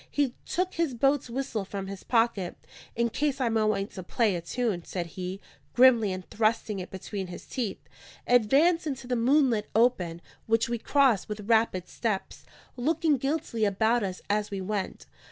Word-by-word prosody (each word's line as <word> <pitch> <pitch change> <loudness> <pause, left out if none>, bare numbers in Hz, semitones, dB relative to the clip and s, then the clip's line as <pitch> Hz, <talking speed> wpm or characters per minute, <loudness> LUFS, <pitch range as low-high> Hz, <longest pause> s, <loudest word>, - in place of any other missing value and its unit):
He 280 -4 0
took 365 +1 -1
his 330 -7 -1
boat's 275 +1 +2
whistle 235 -4 -2
from 195 0 -5
his 195 0 -7
pocket. 225 -6 +1 0.4
"In 235 0 +1
case 280 +4 -1
I 250 -3 +1
might 220 -1 +2
want 200 -2 0
to 190 - -7
play 205 +2 +1
a 170 - -3
tune," 205 -1 -2
said 175 0 -4
he, 185 +1 -5 0.4
grimly, 240 -5 +6
and 185 -1 -6
thrusting 215 -2 0
it 180 - -6
between 190 0 -5
his 175 - -9
teeth, 235 -7 -3 0.5
advanced 285 +9 +4
into 270 -3 -4
the 250 0 -1
moonlit 245 -3 +2
open; 185 -8 +2 0.2
which 225 0 +2
we 235 0 -2
crossed 260 -7 +2
with 210 0 -4
rapid 220 -6 +2
steps, 215 -5 -3 0.3
looking 300 +3 +1
guiltily 270 -4 -2
about 220 +4 +2
us 190 -3 -4
as 210 0 0
we 200 -2 -4
went. 195 0 -3
225 Hz, 170 wpm, -28 LUFS, 195-255 Hz, 0.5 s, grimly